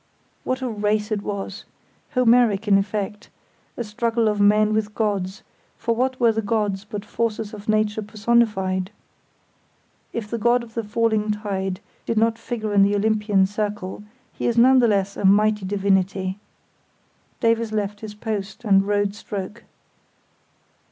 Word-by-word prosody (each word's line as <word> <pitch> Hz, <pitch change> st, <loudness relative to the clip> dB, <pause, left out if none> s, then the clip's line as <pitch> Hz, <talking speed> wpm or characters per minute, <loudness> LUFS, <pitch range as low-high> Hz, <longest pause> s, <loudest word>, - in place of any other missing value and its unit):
What 255 Hz, +1 st, -2 dB
a -, -, 0 dB
race 210 Hz, -1 st, -1 dB
it 210 Hz, -1 st, 0 dB
was! 200 Hz, 0 st, -5 dB, 0.5 s
Homeric, 235 Hz, -4 st, +4 dB
in 195 Hz, -1 st, +5 dB
effect; 205 Hz, +1 st, -4 dB, 0.5 s
a 240 Hz, -, -2 dB
struggle 230 Hz, +1 st, 0 dB
of 210 Hz, -1 st, +1 dB
men 210 Hz, +1 st, +4 dB
with 215 Hz, -1 st, -1 dB
gods, 200 Hz, -3 st, -2 dB, 0.3 s
for 230 Hz, 0 st, -1 dB
what 255 Hz, +2 st, 0 dB
were 235 Hz, -2 st, +5 dB
the 220 Hz, 0 st, -1 dB
gods 205 Hz, -2 st, -1 dB
but 205 Hz, 0 st, -7 dB
forces 220 Hz, -1 st, -2 dB
of 210 Hz, 0 st, -8 dB
nature 215 Hz, 0 st, +1 dB
personified? 210 Hz, -4 st, +1 dB, 1.2 s
If 230 Hz, -3 st, -4 dB
the 230 Hz, +2 st, -3 dB
God 240 Hz, +2 st, +3 dB
of 225 Hz, -1 st, -13 dB
the 230 Hz, -, -2 dB
Falling 215 Hz, 0 st, 0 dB
Tide 195 Hz, -3 st, -2 dB, 0.3 s
did 230 Hz, -, -1 dB
not 225 Hz, +1 st, +2 dB
figure 225 Hz, -2 st, -4 dB
in 200 Hz, -, +5 dB
the 200 Hz, +1 st, +4 dB
Olympian 210 Hz, -2 st, +2 dB
circle 205 Hz, -1 st, -4 dB, 0.3 s
he -, -, -3 dB
is 235 Hz, -1 st, 0 dB
none 260 Hz, +2 st, +6 dB
the 240 Hz, -, +4 dB
less 200 Hz, -2 st, +1 dB
a -, -, -4 dB
mighty 210 Hz, +1 st, +4 dB
divinity. 190 Hz, -1 st, 0 dB, 1.0 s
Davies 230 Hz, -1 st, +1 dB
left 205 Hz, -1 st, -2 dB
his 215 Hz, -1 st, -7 dB
post, 210 Hz, 0 st, -5 dB
and 195 Hz, -1 st, +4 dB
rowed 205 Hz, -1 st, +1 dB
stroke. 205 Hz, +2 st, -7 dB
210 Hz, 150 wpm, -23 LUFS, 200-225 Hz, 1.2 s, none